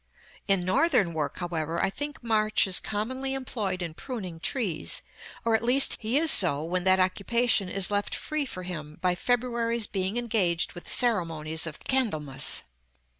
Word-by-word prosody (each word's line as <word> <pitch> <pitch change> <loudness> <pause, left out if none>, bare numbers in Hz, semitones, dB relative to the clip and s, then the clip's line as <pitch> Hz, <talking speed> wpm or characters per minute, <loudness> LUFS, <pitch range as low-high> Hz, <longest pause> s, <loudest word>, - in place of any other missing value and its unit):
In 195 -3 +2
Northern 195 - +2
work, 150 -3 -2
however, 165 -2 -3
I 195 - +1
think 290 +4 -5
March 215 -2 +2
is 190 -2 +4
commonly 260 +6 -3
employed 205 -8 -3
in 165 -2 -5
pruning 185 -5 -6
trees; 190 - -1 0.4
or, 230 - +2
at 220 - +3
least, 250 +4 +5
he 225 +4 +1
is 320 +1 +4
so 155 -6 +4
when 180 +2 -2
that 190 0 +5
occupation 200 +2 +1
is 195 0 +1
left 205 0 -1
free 305 -2 -3
for 185 -5 -7
him 155 -4 -7
by 180 -1 +2
February's 235 +1 0
being 195 +2 -2
engaged 205 -8 +1
with 175 - -10
the - - -7
ceremonies 165 -8 0
of 155 - -6
Candlemas. 155 - +1
195 Hz, 165 wpm, -27 LUFS, 175-235 Hz, 0.4 s, least